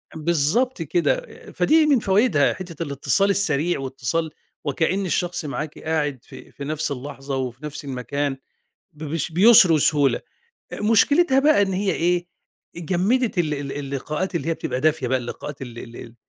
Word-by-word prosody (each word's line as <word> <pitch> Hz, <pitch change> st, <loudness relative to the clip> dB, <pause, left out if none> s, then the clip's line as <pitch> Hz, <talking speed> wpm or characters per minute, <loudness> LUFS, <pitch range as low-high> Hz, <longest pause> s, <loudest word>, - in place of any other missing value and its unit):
بالضبط 170 Hz, -, 0 dB
كده، 175 Hz, -, +1 dB, 0.3 s
فدي 315 Hz, 0 st, +3 dB
من 280 Hz, -5 st, +4 dB
فوايدها 195 Hz, -, +2 dB
حتة 170 Hz, -3 st, -7 dB
الاتصال 145 Hz, +7 st, +1 dB
السريع، 175 Hz, -5 st, +1 dB
واتصال 135 Hz, +4 st, -2 dB, 0.4 s
وكأن 170 Hz, +7 st, 0 dB
الشخص 175 Hz, -2 st, -2 dB
معاكِ 150 Hz, +1 st, -5 dB
قاعد 150 Hz, -4 st, -1 dB
في -, -, -13 dB
في 140 Hz, -, -9 dB
نفس 155 Hz, +1 st, -2 dB
اللحظة، 135 Hz, 0 st, -5 dB
وفي 130 Hz, +2 st, -5 dB
نفس 150 Hz, -1 st, -7 dB
المكان 135 Hz, +2 st, -3 dB, 0.6 s
ب 155 Hz, 0 st, -9 dB
بس 155 Hz, +2 st, -2 dB
بيُسْر 190 Hz, -1 st, +7 dB
وسهولة، 145 Hz, -2 st, +3 dB, 0.5 s
مشكلتها 265 Hz, +8 st, +3 dB
بقى 290 Hz, -6 st, +4 dB
إن 195 Hz, -1 st, 0 dB
هي 195 Hz, +1 st, 0 dB
إيه 175 Hz, +1 st, 0 dB, 0.5 s
جمِّدِت 190 Hz, +7 st, 0 dB
ال 155 Hz, -3 st, +1 dB
ال 140 Hz, -1 st, -5 dB
اللقاءات 145 Hz, +6 st, -4 dB
اللي 165 Hz, -1 st, -2 dB
هي 165 Hz, -, +1 dB
بتبقى 125 Hz, -4 st, -4 dB
دافية 150 Hz, -4 st, +1 dB
بقى، 130 Hz, -, +1 dB
اللقاءات 130 Hz, +3 st, -7 dB
ال 120 Hz, -2 st, -8 dB
ال 120 Hz, 0 st, -10 dB
ال 115 Hz, -, -10 dB
155 Hz, 155 wpm, -22 LUFS, 140-190 Hz, 0.6 s, بيُسْر